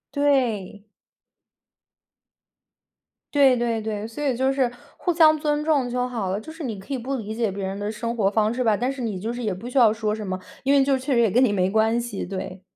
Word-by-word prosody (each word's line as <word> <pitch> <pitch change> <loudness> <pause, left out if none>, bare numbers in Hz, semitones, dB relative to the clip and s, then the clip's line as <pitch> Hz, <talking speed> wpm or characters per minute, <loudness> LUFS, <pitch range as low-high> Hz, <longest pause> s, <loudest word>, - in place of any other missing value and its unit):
对。 240 -9 +1 2.5
对 275 -3 +5
对 235 -2 -1
对， 215 -1 -4
所 230 +6 -7
以 270 -4 +1
就 265 +2 +1
是 265 -3 +1 0.3
互 355 - 0
相 315 -2 +6
尊 295 0 0
重 290 -5 +1
就 250 0 -1
好 230 -6 -3
了， 195 +2 -1
就 315 - -10
是 320 -1 -7
你 225 -5 -4
可 195 +8 -7
以 265 - -1
不 260 +3 -3
理 220 -3 -5
解 225 -2 0
别 195 +1 -5
人 195 +1 -4
的 205 +1 -3
生 225 +2 -3
活 205 -4 +2
方 215 +1 +1
式 255 - -3
吧， 220 -3 +3
但 245 +5 -1
是 275 -1 -7
你 220 -5 -2
就 215 +5 -3
是 240 +1 -5
也 215 -4 -1
不 210 +7 -7
需 265 - -3
要 235 -4 +7
说 215 -1 -1
什 215 -2 -5
么， 185 0 -2 0.3
因 275 +1 +3
为 275 -1 +5
就 270 -1 +2
确 265 +2 -2
实 235 - +4
也 225 - +3
跟 250 +5 +4
你 225 -5 +3
没 185 -1 +1
关 220 +3 +2
系， 235 -4 -4
对。 185 0 -6
235 Hz, 260 characters per minute, -24 LUFS, 210-265 Hz, 2.5 s, 要